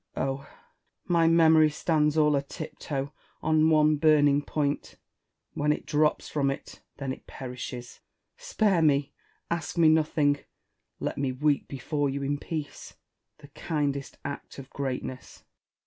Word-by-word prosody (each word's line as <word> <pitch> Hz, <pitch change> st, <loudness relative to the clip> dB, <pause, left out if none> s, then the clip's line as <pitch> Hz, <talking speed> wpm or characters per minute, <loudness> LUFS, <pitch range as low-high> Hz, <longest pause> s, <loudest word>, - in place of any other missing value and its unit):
Oh 135 Hz, 0 st, 0 dB
1 140 Hz, -, -15 dB, 0.6 s
my 170 Hz, -2 st, +3 dB
memory 160 Hz, -1 st, +6 dB
stands 150 Hz, 0 st, +1 dB
all 150 Hz, -1 st, +4 dB
a 140 Hz, -, +2 dB
tip 155 Hz, +3 st, -8 dB
toe 140 Hz, 0 st, -4 dB, 0.3 s
on 155 Hz, 0 st, +4 dB
one 155 Hz, -1 st, +4 dB
burning 145 Hz, -2 st, +4 dB
point: 145 Hz, -1 st, -2 dB, 0.6 s
Avhen 150 Hz, +1 st, +1 dB
it -, -, -2 dB
drops 150 Hz, 0 st, +1 dB
from 140 Hz, -2 st, 0 dB
it, 135 Hz, -, -6 dB, 0.2 s
then 135 Hz, -2 st, -3 dB
it -, -, -14 dB
perishes. 125 Hz, -1 st, -7 dB, 0.4 s
Spare 220 Hz, -, +1 dB
me: 145 Hz, -3 st, +2 dB, 0.4 s
ask 170 Hz, -1 st, -3 dB
me 165 Hz, -2 st, +6 dB
nothing; 150 Hz, -2 st, +2 dB, 0.6 s
let -, -, -3 dB
me 135 Hz, -2 st, 0 dB
weep 145 Hz, +2 st, 0 dB
before 145 Hz, +2 st, -2 dB
you 140 Hz, +1 st, -3 dB
in 145 Hz, +1 st, -1 dB
peace, 155 Hz, -2 st, -6 dB, 0.2 s
— -, -, -56 dB
the 145 Hz, -, -13 dB
kindest 140 Hz, -2 st, -3 dB
act 140 Hz, -, -6 dB
of 135 Hz, -1 st, -10 dB
greatness. 130 Hz, -1 st, -5 dB
Essex. -, -, -42 dB
145 Hz, 150 wpm, -27 LUFS, 140-155 Hz, 0.6 s, memory